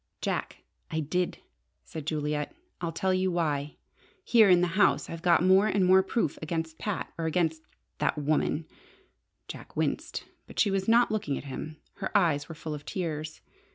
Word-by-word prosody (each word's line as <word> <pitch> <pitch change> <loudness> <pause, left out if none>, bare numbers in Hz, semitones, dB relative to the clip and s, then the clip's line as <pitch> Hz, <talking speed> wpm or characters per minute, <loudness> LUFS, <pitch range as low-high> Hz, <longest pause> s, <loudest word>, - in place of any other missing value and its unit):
"Jack, - - -3 0.3
I 160 -2 -1
did!" 175 +4 -1 0.5
said 155 -2 -8
Juliet. 150 - -2 0.3
"I'll 170 -1 -1
tell 190 +3 0
you 185 0 +1
why. 150 -4 -1 0.5
Here 225 - +6
in 180 -1 +6
the 180 - +2
house 200 -1 +3
I've 165 0 -6
got 175 -1 +4
more 190 +3 +5
and 195 -2 +2
more 190 +1 +7
proof 190 -4 -1
against 160 0 -3
Pat 210 -4 -3
or 165 - 0
against 160 -1 0 0.4
that - - +1
woman." 150 +1 0 0.8
Jack - - -10
winced, - - -2 0.2
but - - -13
she 205 - +4
was 195 -1 -1
not 235 +1 +5
looking 200 -11 -1
at - - -6
him: 150 +3 -6 0.2
her 195 - -3
eyes 160 -6 +1
were 160 - -7
full 155 0 -5
of 145 -1 -6
tears. 155 -4 -4
165 Hz, 175 wpm, -28 LUFS, 155-190 Hz, 0.8 s, more